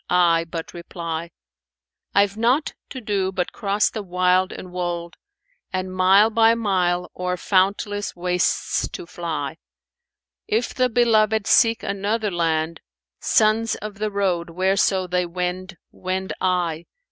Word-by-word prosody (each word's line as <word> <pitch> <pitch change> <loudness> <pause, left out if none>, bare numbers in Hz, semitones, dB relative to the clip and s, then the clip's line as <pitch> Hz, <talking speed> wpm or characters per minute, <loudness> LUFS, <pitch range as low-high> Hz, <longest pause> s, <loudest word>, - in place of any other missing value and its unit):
I 170 -2 +3
but 165 -1 -6
reply: 170 -1 -5 0.9
I've 200 0 +3
naught 245 +7 +1 0.2
to 265 - -6
do 200 -4 -1
but 185 -2 -2
cross 205 -1 0
the 215 - -4
wild 185 0 +1
and 180 - -9
wold 175 -1 -4 0.3
* - - -44
And, 185 0 -3
mile 195 +4 +5
by 225 +1 +5
mile, 180 -5 0
o'er 180 0 -2
fountless 205 +2 0
wastes 180 0 0
to - - -7
fly, 160 -5 -4 0.9
If 225 +2 0
the 255 -1 +2
beloved 220 -3 +3
seek 230 0 +4
another 205 +2 -1
land 165 -1 -1 0.3
* 60 - -66
Sons 220 +1 +2
of 210 -1 -8
the 215 0 -1
road, 185 -4 -1
whereso 190 +2 +1
they 180 0 -1
wend, 180 +1 -4
wend 190 +1 -3
I. 175 -3 0
185 Hz, 135 wpm, -22 LUFS, 175-210 Hz, 0.9 s, mile